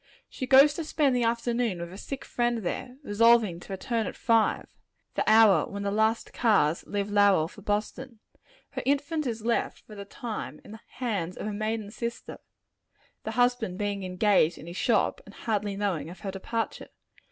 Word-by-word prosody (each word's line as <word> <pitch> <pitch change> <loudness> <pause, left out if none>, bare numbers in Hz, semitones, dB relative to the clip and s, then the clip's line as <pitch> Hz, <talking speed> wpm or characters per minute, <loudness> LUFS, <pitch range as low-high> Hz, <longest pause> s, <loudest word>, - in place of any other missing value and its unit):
She 255 - -6
goes 275 +3 +7
to 330 - -4
spend 295 -4 +1
the 245 -1 +2
afternoon 235 -3 0
with 170 +1 -6
a - - -9
sick 275 -1 -6
friend 240 -2 -1
there, 250 +8 -4
resolving 225 -5 +4
to 175 - -12
return 225 +4 -2
at - - -6
five 225 -2 +2 0.5
the - - 0
hour 220 -2 +6
when 200 0 -5
the 200 - -1
last 220 +2 0
cars 195 -9 +2
leave 205 0 -2
Lowell 200 -6 +4
for 205 - -14
Boston. 215 +5 -3 0.5
Her - - -4
infant 285 +2 0
is 225 -2 -4
left, 235 0 -1
for 215 - -14
the 200 -1 -7
time, 220 +2 -6
in - - -12
the 220 - -10
hands 200 -9 -3
of - - -5
a 210 - -3
maiden 215 0 -3
sister 235 +1 -6 0.9
the 220 - -2
husband 245 -5 +1
being 205 -1 -2
engaged 185 -2 +2
in - - -11
his 170 +1 -8
shop, 220 +1 +1
and 200 - -15
hardly 210 -3 -2
knowing 195 -6 -2
of 180 +1 -11
her 195 - -4
departure. 225 +4 -4
220 Hz, 185 wpm, -27 LUFS, 200-240 Hz, 0.9 s, goes